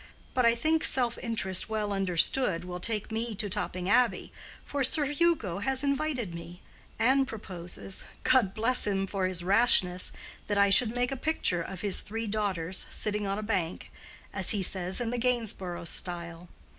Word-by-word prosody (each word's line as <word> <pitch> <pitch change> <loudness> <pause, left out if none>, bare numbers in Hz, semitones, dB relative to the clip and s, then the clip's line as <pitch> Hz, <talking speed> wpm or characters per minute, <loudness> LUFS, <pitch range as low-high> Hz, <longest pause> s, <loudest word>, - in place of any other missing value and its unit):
But 250 -2 +2
I 235 - +3
think 315 +6 0
self 245 -2 +2
interest 215 -5 -1
well 210 -2 -2
understood 190 +1 +1
will 180 0 -7
take 215 +2 -1
me 225 0 -3
to 210 +1 -3
Topping 185 -3 -4
Abbey, 240 +4 +1 0.3
for 285 -1 -2
Sir 295 +4 +3
Hugo 290 - 0
has 265 +5 0
invited 280 - -2
me, 170 +2 -10 0.3
and 265 +4 +2
proposes—God 195 +2 -2
bless 230 +2 +3
him 195 -1 -1
for 195 -1 -2
his 180 -2 -1
rashness! 190 -3 +5 0.4
—that 205 - -1
I 200 0 +3
should 225 +3 +5
make 245 +1 -1
a - - -2
picture 260 - 0
of 180 +2 -7
his 200 -3 +2
three 225 +2 -5
daughters 195 -4 -1
sitting 210 -1 -1
on 195 +1 -2
a 215 - -5
bank—as 190 -1 -4
he 205 -3 +4
says, 185 0 0
in 235 -1 -2
the 245 - -3
Gainsborough 220 -8 -2
style. 170 0 -3
205 Hz, 165 wpm, -28 LUFS, 185-245 Hz, 0.4 s, rashness